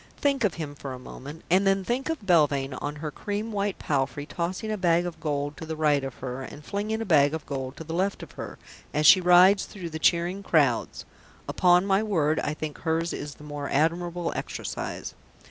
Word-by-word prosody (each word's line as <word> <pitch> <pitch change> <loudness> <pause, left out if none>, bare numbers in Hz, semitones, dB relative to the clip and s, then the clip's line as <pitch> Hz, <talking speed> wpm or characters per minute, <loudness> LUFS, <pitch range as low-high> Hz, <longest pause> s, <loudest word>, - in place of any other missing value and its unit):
Think 275 -3 +1
of 200 -6 +1
him 150 -3 -5
for 140 -2 -7
a - - -6
moment, 140 +4 -10
and 190 +3 +3
then 195 0 +3
think 245 +9 -2
of 320 -10 -3
Belvane 145 -6 +3
on 145 +1 -3
her 150 - -2
cream 210 +6 -4
white 205 -1 -1
palfrey 145 0 -1
tossing 180 +7 -3
a - - 0
bag 175 -3 +2
of 175 -2 -6
gold 145 -1 -2
to 160 0 -5
right 150 -3 +2
of 135 -2 -5
her 130 0 -5
and 145 +3 -9
flinging 215 +2 -2
a - - -2
bag 150 -4 +4
of 160 - -6
gold 135 -1 -5
to - - -6
left 180 +5 -1
of - - -11
her, - - -8 0.4
as 150 +1 +2
she 185 - +9
rides 180 +3 +6
through 175 -5 -8
the 160 - -5
cheering 175 +4 +2
crowds; 145 -11 +1 0.4
upon 180 +1 +4
my 195 0 +3
word 160 -8 +1
I 150 - -2
think 155 -1 -6
hers 165 +1 -1
is 145 -1 -6
the - - -15
more 145 -1 -5
admirable 170 +3 0
exercise. - - -5
165 Hz, 205 wpm, -26 LUFS, 145-190 Hz, 0.4 s, she